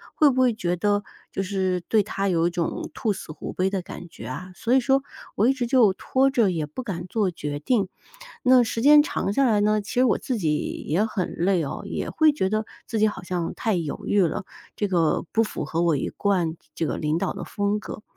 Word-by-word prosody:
会 300 Hz, -2 st, +5 dB
不 260 Hz, 0 st, +1 dB
会 255 Hz, -1 st, +4 dB
觉 175 Hz, -4 st, -1 dB
得 205 Hz, +3 st, +1 dB, 0.3 s
就 195 Hz, -, -2 dB
是 185 Hz, -1 st, 0 dB
对 220 Hz, -, +4 dB
他 200 Hz, -1 st, -2 dB
有 170 Hz, -2 st, +2 dB
一 -, -, +1 dB
种 175 Hz, -1 st, -3 dB
兔 215 Hz, -, 0 dB
死 185 Hz, -, -8 dB
狐 155 Hz, -, -7 dB
悲 185 Hz, +1 st, +1 dB
的 190 Hz, -2 st, -2 dB
感 175 Hz, -, -9 dB
觉 -, -, -11 dB
啊， 185 Hz, 0 st, -6 dB
所 235 Hz, -, 0 dB
以 265 Hz, -, +6 dB
说 270 Hz, +2 st, +2 dB, 0.3 s
我 215 Hz, -, +3 dB
一 265 Hz, -, +4 dB
直 255 Hz, -3 st, -2 dB
就 235 Hz, -6 st, +5 dB
拖 265 Hz, +7 st, +1 dB
着 230 Hz, -6 st, +3 dB
也 165 Hz, -4 st, -1 dB
不 150 Hz, +11 st, -7 dB
敢 185 Hz, -8 st, -5 dB
做 210 Hz, -1 st, 0 dB
决 145 Hz, -4 st, -5 dB
定。 200 Hz, -, +1 dB, 0.5 s
那 255 Hz, -1 st, +6 dB
时 225 Hz, 0 st, -3 dB
间 295 Hz, +3 st, +8 dB
长 200 Hz, -, -2 dB
下 275 Hz, +6 st, +2 dB
来 215 Hz, -4 st, +3 dB
呢， 215 Hz, +1 st, +3 dB
其 200 Hz, -, -9 dB
实 250 Hz, -, +3 dB
我 245 Hz, -, +3 dB
自 255 Hz, -4 st, -3 dB
己 155 Hz, -5 st, +1 dB, 0.3 s
也 180 Hz, +8 st, +2 dB
很 205 Hz, -5 st, -3 dB
累 180 Hz, -1 st, +2 dB
哦， 140 Hz, -, -5 dB
也 -, -, -4 dB
会 315 Hz, -1 st, +4 dB
觉 235 Hz, -10 st, -1 dB
得 215 Hz, +1 st, -1 dB, 0.2 s
自 230 Hz, -, -2 dB
己 215 Hz, 0 st, +4 dB
好 210 Hz, -3 st, -4 dB
像 175 Hz, -2 st, -3 dB
太 220 Hz, -3 st, -1 dB
犹 165 Hz, -5 st, -3 dB
豫 205 Hz, -, +3 dB
了， 165 Hz, -, -2 dB, 0.3 s
这 205 Hz, -, -1 dB
个 170 Hz, -5 st, +1 dB
不 225 Hz, -, +3 dB
符 215 Hz, -, -4 dB
合 165 Hz, +1 st, -1 dB
我 170 Hz, -3 st, +3 dB
一 -, -, -2 dB
贯 180 Hz, -6 st, 0 dB, 0.2 s
这 165 Hz, -, -2 dB
个 -, -, -2 dB
领 155 Hz, +1 st, 0 dB
导 -, -, -1 dB
的 -, -, -6 dB
风 205 Hz, +1 st, -1 dB
格， 210 Hz, -, -8 dB
200 Hz, 260 characters per minute, -24 LUFS, 175-230 Hz, 0.5 s, 间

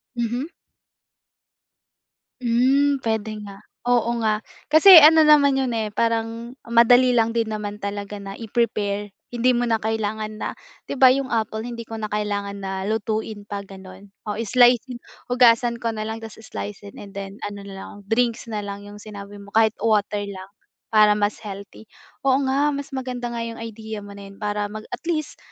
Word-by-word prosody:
Mhm? 240 Hz, +6 st, -2 dB, 1.9 s
Hmm, 270 Hz, +4 st, +3 dB
puwede 220 Hz, -2 st, -2 dB, 0.2 s
nga. 200 Hz, +1 st, -12 dB, 0.2 s
Oo 240 Hz, -1 st, +2 dB
nga 215 Hz, -1 st, 0 dB, 0.3 s
kasi 330 Hz, +4 st, +9 dB
ano 315 Hz, +1 st, +9 dB
naman 290 Hz, -3 st, +6 dB
'yon 260 Hz, -, -1 dB, 0.2 s
parang 230 Hz, +2 st, -2 dB
madali 245 Hz, +2 st, +5 dB
lang 230 Hz, -1 st, +3 dB
din 225 Hz, -1 st, +1 dB
naman 210 Hz, -1 st, -4 dB
talaga 205 Hz, 0 st, -5 dB
na 195 Hz, 0 st, -8 dB
i-prepare. 205 Hz, -3 st, -2 dB, 0.2 s
Hindi 245 Hz, +1 st, +2 dB
mo 240 Hz, -, +1 dB
na 225 Hz, -, +3 dB
kailangan 215 Hz, 0 st, -3 dB
na -, -, -4 dB, 0.3 s
'di -, -, -3 dB
ba 260 Hz, -1 st, +8 dB
'yong 270 Hz, 0 st, -2 dB
apple 220 Hz, -1 st, -1 dB
hindi 235 Hz, -1 st, -6 dB
ko 225 Hz, -, -11 dB
na 215 Hz, -, -3 dB
kailangan 205 Hz, -1 st, -2 dB
na 190 Hz, 0 st, -4 dB
lutuin 220 Hz, -1 st, -3 dB
pa 200 Hz, -1 st, -5 dB
ganon. 190 Hz, 0 st, -13 dB, 0.3 s
slice 240 Hz, +1 st, +5 dB
and 245 Hz, -, -6 dB, 0.3 s
hugasan 240 Hz, -1 st, +4 dB
ko 230 Hz, -1 st, -2 dB
na 215 Hz, -, -5 dB
lang 220 Hz, +1 st, -4 dB
tapos 225 Hz, 0 st, -10 dB
slice 100 Hz, +1 st, -6 dB
in 100 Hz, -, -12 dB
and 200 Hz, -1 st, -11 dB
then 195 Hz, 0 st, -7 dB
ano 205 Hz, -1 st, -6 dB
na 200 Hz, -1 st, -9 dB
lang -, -, -9 dB, 0.2 s
drinks 230 Hz, 0 st, 0 dB
na 215 Hz, -1 st, -3 dB
lang 200 Hz, 0 st, -6 dB
yung 205 Hz, 0 st, -11 dB
sinabi 205 Hz, -1 st, -10 dB
mo 200 Hz, 0 st, -13 dB
kahit 220 Hz, 0 st, +3 dB
water 210 Hz, -2 st, +1 dB
lang 190 Hz, -1 st, -9 dB, 0.4 s
para 215 Hz, -2 st, +5 dB
mas 210 Hz, 0 st, 0 dB
healthy. 200 Hz, 0 st, -10 dB, 0.4 s
Oo 270 Hz, +1 st, +3 dB
nga, 285 Hz, +2 st, +2 dB
mas 280 Hz, 0 st, -5 dB
maganda 255 Hz, -2 st, -4 dB
nga 235 Hz, -1 st, -4 dB
yung 230 Hz, 0 st, -7 dB
idea 220 Hz, -1 st, -7 dB
mo 200 Hz, 0 st, -11 dB
na 200 Hz, -, -10 dB
yun 195 Hz, -, -18 dB
para 210 Hz, 0 st, -1 dB
mag 215 Hz, +1 st, -7 dB
at -, -, -7 dB
least 310 Hz, -3 st, -2 dB
220 Hz, 175 wpm, -23 LUFS, 205-240 Hz, 1.9 s, kasi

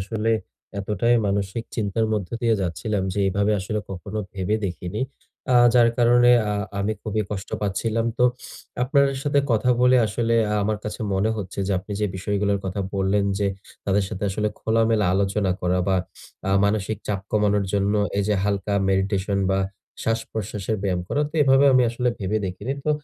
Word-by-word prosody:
আসলে 110 Hz, +3 st, -1 dB, 0.5 s
এতটাই 105 Hz, +4 st, +1 dB
মানসিক 100 Hz, +3 st, -1 dB
চিন্তার 110 Hz, +1 st, 0 dB
মধ্যে 105 Hz, +1 st, -2 dB
দিয়ে 115 Hz, -1 st, +3 dB
যাচ্ছিলাম 95 Hz, +4 st, -2 dB
যে, 100 Hz, -, 0 dB
এভাবে 100 Hz, +2 st, +1 dB
আসলে 105 Hz, +3 st, -2 dB
কখনো 95 Hz, +3 st, -5 dB
ভেবে 100 Hz, +2 st, -1 dB
দেখিনি। 90 Hz, +2 st, -4 dB, 0.5 s
আহ 120 Hz, -1 st, +6 dB
যার 120 Hz, -1 st, +6 dB
কারণে 120 Hz, +1 st, +5 dB, 0.2 s
আহ 105 Hz, 0 st, -1 dB, 0.2 s
আমি 100 Hz, +2 st, 0 dB
খুবই 110 Hz, 0 st, -1 dB
কষ্ট 100 Hz, -1 st, -5 dB
পাচ্ছিলাম। 110 Hz, +3 st, 0 dB
তো 125 Hz, -, +4 dB, 0.6 s
আপনার 140 Hz, +2 st, +3 dB, 0.2 s
সাথে 145 Hz, 0 st, +2 dB
কথা 120 Hz, +3 st, +2 dB
বলে 125 Hz, +1 st, +5 dB
আসলে 115 Hz, +2 st, 0 dB, 0.2 s
আ -, -, +1 dB
আমার 105 Hz, +1 st, 0 dB
কাছে 105 Hz, 0 st, -5 dB
মনে 100 Hz, +3 st, +1 dB
হচ্ছে 100 Hz, -2 st, -6 dB
যে, 100 Hz, -, 0 dB
আপনি 100 Hz, +3 st, -8 dB
যে, 105 Hz, -, +2 dB
বিষয়গুলোর 100 Hz, +1 st, 0 dB
কথা 95 Hz, +1 st, -3 dB
বললেন 100 Hz, +1 st, +1 dB
যে, 100 Hz, -, +1 dB, 0.4 s
তাদের 100 Hz, 0 st, +2 dB
সাথে 105 Hz, -1 st, -4 dB
আসলে 105 Hz, +2 st, 0 dB
খোলামেলা 110 Hz, -1 st, +2 dB
আলোচনা 100 Hz, 0 st, +1 dB
করা, 90 Hz, +1 st, +1 dB
বা 95 Hz, -, +3 dB, 0.5 s
আ -, -, +1 dB
মানসিক 105 Hz, 0 st, 0 dB
চাপ 100 Hz, -2 st, -1 dB
কমানোর 105 Hz, -1 st, +2 dB
জন্য 100 Hz, +1 st, +1 dB, 0.2 s
এইযে 105 Hz, +1 st, +1 dB
হালকা 100 Hz, 0 st, -1 dB, 0.2 s
মেডিটেশন 95 Hz, +1 st, 0 dB
বা, 95 Hz, -, +2 dB, 0.5 s
শ্বাস-প্রশ্বাসের 110 Hz, -2 st, -2 dB
ব্যায়াম 90 Hz, -3 st, 0 dB
করা, 145 Hz, -, 0 dB
তো -, -, -29 dB
এভাবে 135 Hz, 0 st, +5 dB
আমি 130 Hz, -1 st, +5 dB
আসলে 125 Hz, +1 st, -1 dB
ভেবে 105 Hz, +2 st, -1 dB
দেখিনি। 100 Hz, +8 st, -4 dB
তো 150 Hz, -, +1 dB
105 Hz, 170 wpm, -23 LUFS, 95-115 Hz, 0.6 s, আহ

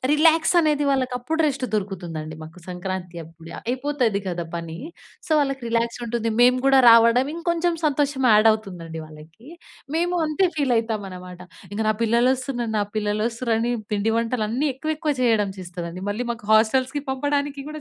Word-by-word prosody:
Relax 320 Hz, +2 st, +4 dB
అనేది, 300 Hz, -2 st, +1 dB
వాళ్ళకి 260 Hz, -2 st, 0 dB
అప్పుడు 320 Hz, +6 st, -2 dB
రెస్ట్ 270 Hz, -2 st, -2 dB
దొరుకుతుందండి. 175 Hz, -6 st, -4 dB
మాకు 160 Hz, +3 st, -11 dB
సంక్రాంతి 180 Hz, -1 st, -5 dB
అప్పుడే 165 Hz, +1 st, -13 dB
అయిపోతది 250 Hz, -4 st, -1 dB
కదా 175 Hz, -2 st, -3 dB
పని. 165 Hz, -1 st, -6 dB, 0.5 s
సో 330 Hz, -, -14 dB
వాళ్ళకి 275 Hz, -2 st, -2 dB
రిలాక్స్ 230 Hz, +1 st, -1 dB
ఉంటుంది. 230 Hz, -1 st, -1 dB
మేము 250 Hz, +1 st, +5 dB
కూడా 270 Hz, -1 st, +6 dB
రావడం, 230 Hz, +3 st, +6 dB
ఇంకొంచెం 340 Hz, 0 st, 0 dB
సంతోషం 285 Hz, -2 st, 0 dB
యాడ్ 215 Hz, +1 st, +6 dB
అవుతుందండి 175 Hz, -7 st, -6 dB
వాళ్ళకి. 155 Hz, -, -15 dB, 0.5 s
మేము 350 Hz, +1 st, 0 dB
అంతే 310 Hz, +5 st, +2 dB
ఫీల్ 275 Hz, -4 st, +1 dB
అవుతాం 220 Hz, -3 st, -3 dB
అనమాట. 180 Hz, 0 st, -10 dB, 0.3 s
ఇంక 210 Hz, -, -4 dB
"నా 215 Hz, -, +4 dB
పిల్లలొస్తున్నారు, 240 Hz, 0 st, +1 dB
నా -, -, +2 dB
పిల్లలొస్తున్నారు" 225 Hz, +3 st, -1 dB
అని 240 Hz, +1 st, 0 dB, 0.2 s
పిండి 210 Hz, +2 st, +1 dB
వంటలన్నీ 235 Hz, +4 st, -1 dB
ఎక్కువ 310 Hz, +4 st, -3 dB
ఎక్కువ 300 Hz, -2 st, -1 dB
చేయడం 220 Hz, -4 st, +2 dB
చేస్తాదండి. 175 Hz, 0 st, -7 dB
మళ్ళీ 235 Hz, +4 st, -3 dB
మాకు 220 Hz, -3 st, -11 dB
హోస్టెల్స్‌కి 255 Hz, +6 st, +2 dB
పంపడానికి 285 Hz, +1 st, -1 dB
కూడా 305 Hz, 0 st, -7 dB
235 Hz, 155 wpm, -23 LUFS, 195-275 Hz, 0.5 s, కూడా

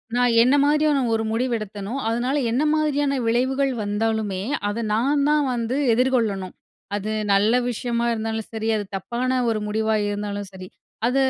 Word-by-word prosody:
நான் 245 Hz, -1 st, +3 dB
என்ன 255 Hz, +4 st, +4 dB
மாதிரியான 300 Hz, 0 st, +3 dB
ஒரு 225 Hz, 0 st, 0 dB
முடிவு 245 Hz, +2 st, 0 dB
எடுத்தனோ, 205 Hz, 0 st, -6 dB
அதனால 240 Hz, +4 st, 0 dB, 0.2 s
என்ன 255 Hz, +5 st, +1 dB
மாதிரியான 290 Hz, -2 st, +1 dB
விளைவுகள் 265 Hz, +4 st, +1 dB
வந்தாலுமே, 205 Hz, -2 st, -1 dB, 0.3 s
அத 230 Hz, +3 st, -3 dB
நான் 280 Hz, +6 st, +2 dB
தான் 300 Hz, -1 st, +3 dB
வந்து 235 Hz, +1 st, -2 dB, 0.2 s
எதிர்கொள்ளணும். 225 Hz, -7 st, 0 dB, 0.4 s
அது 210 Hz, +1 st, -3 dB, 0.2 s
நல்ல 205 Hz, +4 st, +3 dB, 0.2 s
விஷயமா 235 Hz, 0 st, -2 dB
இருந்தாலும் 220 Hz, -1 st, -3 dB
சரி 220 Hz, 0 st, -3 dB
அது 210 Hz, -, -2 dB
தப்பான 250 Hz, +6 st, -1 dB
ஒரு 220 Hz, -1 st, 0 dB
முடிவா 220 Hz, +1 st, 0 dB
இருந்தாலும் 205 Hz, -1 st, -4 dB
சரி, 185 Hz, -1 st, -10 dB, 0.4 s
அத 250 Hz, +2 st, +1 dB
230 Hz, 150 wpm, -23 LUFS, 210-255 Hz, 0.4 s, என்ன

